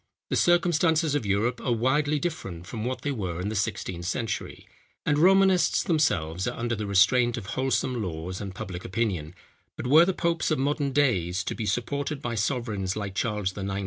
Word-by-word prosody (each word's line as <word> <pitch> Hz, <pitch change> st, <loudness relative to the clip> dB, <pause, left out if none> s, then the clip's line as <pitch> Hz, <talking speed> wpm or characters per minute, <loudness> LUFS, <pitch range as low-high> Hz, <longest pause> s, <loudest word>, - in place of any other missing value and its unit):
The -, -, +2 dB
circumstances 165 Hz, -2 st, +3 dB
of 140 Hz, -8 st, -1 dB
Europe 110 Hz, +5 st, 0 dB
are 125 Hz, -, 0 dB
widely 145 Hz, +6 st, +1 dB
different 100 Hz, -, -4 dB
from 110 Hz, +2 st, -5 dB
what 130 Hz, +1 st, -3 dB
they 145 Hz, -, -1 dB
were 95 Hz, -9 st, -3 dB
in 95 Hz, +3 st, -2 dB
the 110 Hz, -, -4 dB
sixteenth 100 Hz, -4 st, -2 dB
century; 110 Hz, +1 st, -4 dB, 0.4 s
and 145 Hz, 0 st, +2 dB
Romanists 190 Hz, +1 st, +4 dB
themselves 95 Hz, -, 0 dB
are -, -, -3 dB
under 115 Hz, 0 st, -1 dB
the 105 Hz, -1 st, -4 dB
restraint 120 Hz, +5 st, +4 dB
of 115 Hz, -, -6 dB
wholesome 130 Hz, -2 st, 0 dB
laws 90 Hz, 0 st, -5 dB
and 95 Hz, -2 st, -6 dB
public 90 Hz, -1 st, -6 dB
opinion; 90 Hz, -6 st, -2 dB, 0.4 s
but -, -, -5 dB
were 155 Hz, +7 st, +7 dB
the 190 Hz, -, +1 dB
popes 170 Hz, -2 st, 0 dB
of 155 Hz, -, +1 dB
modern 140 Hz, +1 st, 0 dB
days 100 Hz, -11 st, +1 dB
to -, -, -3 dB
be 110 Hz, -3 st, -4 dB
supported 140 Hz, +7 st, -2 dB
by 120 Hz, -4 st, -3 dB
sovereigns 105 Hz, -4 st, -1 dB
like 100 Hz, -2 st, -4 dB
Charles 105 Hz, -3 st, -1 dB
IX. 95 Hz, -1 st, -3 dB
115 Hz, 185 wpm, -26 LUFS, 95-145 Hz, 0.4 s, were